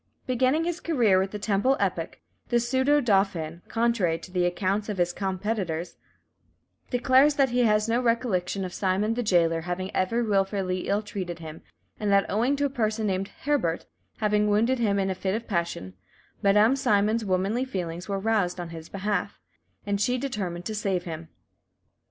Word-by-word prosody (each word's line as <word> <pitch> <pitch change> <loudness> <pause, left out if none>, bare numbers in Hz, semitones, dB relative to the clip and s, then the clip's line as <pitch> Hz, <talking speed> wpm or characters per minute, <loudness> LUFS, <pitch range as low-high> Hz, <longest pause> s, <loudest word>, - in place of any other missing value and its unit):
Beginning 260 +5 +2
his 345 0 -2
career 235 - +3
with 190 +1 0
the 210 - -5
Temple 210 +6 +1
epoch, - - -2 0.3
this 240 -1 +1
pseudo 265 +4 +3
dauphin, 195 - 0
contrary 225 -8 +1
to 180 - -12
the 180 -1 +1
accounts 195 +4 -1
of 205 - -3
his 175 0 +1
competitors, 190 -3 -3 0.9
declares 260 +3 +4
that 270 -3 +3
he 245 0 +3
has 210 0 +3
no 235 +2 +1
recollection 205 -6 0
of 180 - -7
Simon 200 +3 0
the 245 - -1
jailer 170 -6 +2
having 180 +2 -4
ever 230 +6 +1
wilfully 195 -3 0
ill 205 +2 +1
treated 185 -4 -5
him, 160 -1 -9 0.4
and 210 -2 0
that 200 0 +4
owing 235 +8 +2
to 285 0 0
a - - +1
person 220 -4 -1
named 195 -1 -1 0.2
Hébert 260 - 0 0.3
having 210 -1 +2
wounded 230 +5 +2
him 205 -4 +2
in 195 -1 0
a - - 0
fit 190 +1 -2
of 230 +1 -4
passion, 170 - -2 0.5
Madame 210 +5 +5
Simon's 220 -4 +2
womanly 195 +5 0
feelings 180 -7 -5
were 195 -1 -1
aroused 200 -4 0
on 175 -1 -5
his 165 -1 -9
behalf, 200 0 -2 0.5
and 200 0 -1
she 250 +4 +2
determined 195 -10 -4
to 220 - -3
save 195 -4 -1
him. 165 -1 -7
205 Hz, 175 wpm, -26 LUFS, 185-235 Hz, 0.9 s, Madame